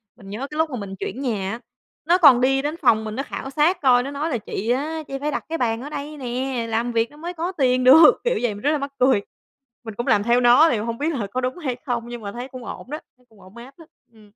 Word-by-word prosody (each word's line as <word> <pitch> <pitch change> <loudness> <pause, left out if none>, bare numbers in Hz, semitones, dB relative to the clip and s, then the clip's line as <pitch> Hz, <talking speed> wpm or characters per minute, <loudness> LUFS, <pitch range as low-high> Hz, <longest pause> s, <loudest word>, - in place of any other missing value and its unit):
Mình 195 -5 -14
nhớ 210 +3 -6
cái 300 - -6
lúc 320 0 +1
mà 255 - -5
mình 195 -1 -7
chuyển 265 - -5
nhà 205 -7 -2
á, 230 - -5 0.5
nó 350 +2 +4
còn 275 -8 +7
đi 270 +1 +2
đến 300 +3 -3
phòng 220 -8 +3
mình 215 0 -5
nó 275 - -2
khảo 270 - -7
sát 310 +6 +1
coi, 250 -2 +4
nó 275 - -5
nói 295 +3 -3
là 245 - -1
"Chị 215 +1 -5
á, 310 +5 -1
chị 275 0 -5
phải 295 +1 -2
đặt - - -3
cái 330 - -2
bàn 230 -1 -1
ở 290 - -7
đây 295 +1 -6
nè, 250 -1 -3
làm 230 +2 -1
việc 230 +1 0
nó 295 - -17
mới 345 +3 -6
có 345 +2 -3
tiền 255 -6 +1
được." 300 +5 +9
Kiểu - - 0
vậy, 235 -4 0
mình 205 - -10
rất 295 - +2
là 305 - +1
mắc 280 0 -5
cười. 255 -5 +4 0.6
Mình 220 - -6
cũng 240 - -4
làm 205 -1 +3
theo 240 +2 +3
nó 250 +7 +6
thì 235 - +1
hông 230 +2 -4
biết 310 +3 -1
là 215 -7 -3
có 255 +6 -3
đúng 255 +5 -3
hay 265 -8 -3
không, 240 -2 -3
nhưng 240 -1 -7
mà 200 -1 -6
thấy 245 +3 -7
cũng 255 -3 -10
ổn - - -8
đó, 305 - -4 0.2
thấy 250 - -30
cũng 210 -3 -21
ổn 190 +5 -16
áp 255 +4 -12
á. 330 - -14 0.3
Ừm. 215 -2 -19
255 Hz, 295 wpm, -22 LUFS, 230-295 Hz, 0.6 s, được